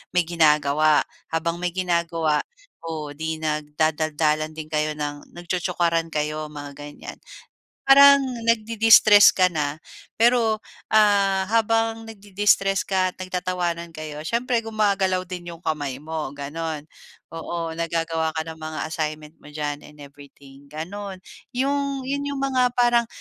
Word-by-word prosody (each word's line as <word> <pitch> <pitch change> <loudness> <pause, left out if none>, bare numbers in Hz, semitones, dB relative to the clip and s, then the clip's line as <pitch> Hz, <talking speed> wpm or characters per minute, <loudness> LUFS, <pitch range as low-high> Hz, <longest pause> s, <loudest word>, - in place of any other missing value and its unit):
may 180 - +4
ginagawa, 155 -2 +3 0.3
habang 165 +1 -1
may 180 - 0
ginagawa, 170 -4 0 0.4
o 155 -3 -5
'di 160 +1 -3
nagdadaldalan 155 0 0
din 155 -1 -7
kayo 155 0 0
ng 145 -1 -5
nagtsotsokaran 175 -1 -1
kayo, 155 0 -2
mga 145 -1 -8
ganyan. 145 0 -9 0.7
Parang 280 +1 +8 0.3
nagde-destress 225 -2 +6
ka 185 - +3
na, 150 -3 -3 0.4
pero 230 -1 +3 0.3
ah, 200 -3 +4
habang 225 0 +1
nagde-destress 200 -2 +1
ka 185 -1 0
at - - -41
nagtatawanan 180 -2 -3
kayo, 155 -1 -7
siyempre 240 +3 0
gumagalaw 200 -4 0
din 180 -1 -8
'yong 165 - -17
kamay 145 -4 -2
mo, 155 -3 -5
gano'n. 150 +2 -5 0.5
Oo, 165 0 -4
naggagawa 165 -1 -1
ka 160 - -1
ng 160 0 -8
mga 155 0 -6
assignment 155 -1 -4
mo - - -18
diyan 150 -1 -4
and 150 - -17
everything, 140 -1 -15
gano'n. 185 +5 -7 0.3
'Yong 275 +1 -1
'yun 280 +2 -3
'yong 280 -1 -3
mga 255 -2 +1
parang 240 -1 +3
170 Hz, 130 wpm, -23 LUFS, 155-205 Hz, 0.7 s, Parang